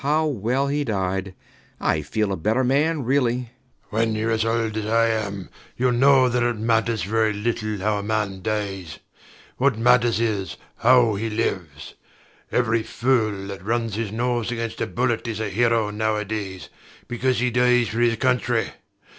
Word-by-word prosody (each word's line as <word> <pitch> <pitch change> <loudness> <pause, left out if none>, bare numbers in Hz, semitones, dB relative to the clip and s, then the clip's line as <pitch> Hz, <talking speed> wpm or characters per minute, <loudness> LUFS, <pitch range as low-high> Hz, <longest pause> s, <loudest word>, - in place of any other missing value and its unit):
How 150 +3 +1
well 130 0 0
he 145 +1 0
died! 95 -4 -2 0.4
I 75 - +1
feel 100 +8 -1
a - - 0
better 110 +9 0
man, 145 +4 +1
really. 125 -1 +2
SIR 125 - -4
PATRICK. 120 -3 -23
When 110 0 +1
youre 110 +1 -1
as 110 0 +1
old 115 -1 -1
as 110 -1 -3
I 115 +1 +3
am, 100 -4 -3 0.3
youll 125 0 +2
know 130 +1 +5
that 125 0 0
it 120 -1 0
matters 110 -2 +1
very 110 +2 +1
little 110 0 -2
how 105 +2 0
a - - -3
man 105 -2 -2
dies. 95 -7 -3 0.6
What 130 -3 +2
matters 120 -1 +3
is, 105 -5 -2 0.2
how 120 -2 +5
he 110 +3 -2
lives. 95 -9 -3 0.6
Every 115 -2 +1
fool 110 -5 0
that 100 -1 -7
runs 115 +1 -1
his 110 -1 -3
nose 120 0 -1
against 115 -1 -4
a - - 0
bullet 120 -2 -1
is 110 -2 -3
a 110 -2 -2
hero 115 +1 +1
nowadays, 105 -2 -3 0.4
because 125 +1 0
he 125 0 +1
dies 125 -1 +3
for 115 - -3
his 120 -1 +3
country. 120 -1 +1
115 Hz, 170 wpm, -23 LUFS, 105-125 Hz, 0.6 s, know